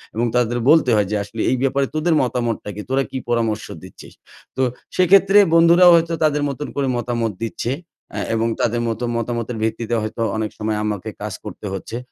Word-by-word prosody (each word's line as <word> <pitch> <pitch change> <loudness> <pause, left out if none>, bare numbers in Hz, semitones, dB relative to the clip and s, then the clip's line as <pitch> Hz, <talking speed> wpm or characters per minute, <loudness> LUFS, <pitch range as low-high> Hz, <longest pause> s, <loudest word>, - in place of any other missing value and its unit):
এবং 115 +2 +1
তাদের 120 -1 +1
বলতে 155 -4 +5
হয় 105 -2 +2
যে - - 0
আসলে 105 +2 -6
"এই 130 - +1
ব্যাপারে 135 +1 +1
তোদের 160 +1 +1
মতামতটা 120 -4 -2
কি? 105 - -5
তোরা 135 +1 +1
কী - - -4
পরামর্শ 115 -3 0 0.2
দিচ্ছিস?" - - -13 0.4
তো - - +1 0.3
সেক্ষেত্রে 195 +2 +5 0.2
বন্ধুরাও 170 +2 +7
হয়তো 165 0 +1
তাদের 150 -1 +2
মতন 140 +2 -5
করে 140 -1 0
মতামত 120 -2 -1
দিচ্ছে। 115 +1 -3 0.5
আ - - -1 0.2
এবং 115 +1 +1
তাদের 120 +1 0
মতো 115 +1 -3
মতামতের 115 0 -3
ভিত্তিতে 110 +1 -1
হয়তো 110 +2 -5 0.2
অনেক 110 -1 -2
সময় 110 0 -2
আমাকে 105 -3 -3
কাজ - - -4
করতে - - -9
হচ্ছে। 105 +4 -5
120 Hz, 185 wpm, -20 LUFS, 110-145 Hz, 0.5 s, বন্ধুরাও